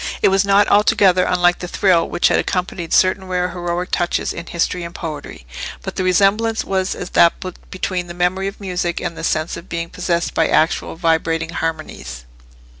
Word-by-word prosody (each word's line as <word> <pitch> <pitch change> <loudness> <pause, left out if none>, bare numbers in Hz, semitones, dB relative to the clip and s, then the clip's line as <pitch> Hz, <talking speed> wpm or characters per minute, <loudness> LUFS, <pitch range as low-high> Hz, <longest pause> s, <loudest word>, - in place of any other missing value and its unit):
It - - +6
was 195 +1 +3
not 200 +1 +4
altogether 195 -3 +4
unlike 175 -1 +2
the 180 - -5
thrill 180 -2 +2
which - - +2
had - - +2
accompanied 180 -2 -3
certain 190 0 +3
rare 180 -1 -1
heroic 175 0 -3
touches 175 -1 0
in 170 - -8
history 170 +1 -1
and 170 0 -8
poetry; 155 - -7 0.4
but - - -6
the 185 - -1
resemblance 200 +5 +2
was 190 0 -1
as - - -7
that 170 - +5 0.4
between 185 -1 -3
the 175 - -8
memory 180 +2 0
of 195 - -7
music, 180 -3 -2
and 170 -1 -4
the - - -8
sense 155 +2 -1
of 170 - -12
being 170 0 -4
possessed 170 -1 -1
by 165 - +2
actual 160 +1 +1
vibrating 165 -1 0
harmonies. 110 - -5
180 Hz, 185 wpm, -19 LUFS, 170-185 Hz, 0.4 s, It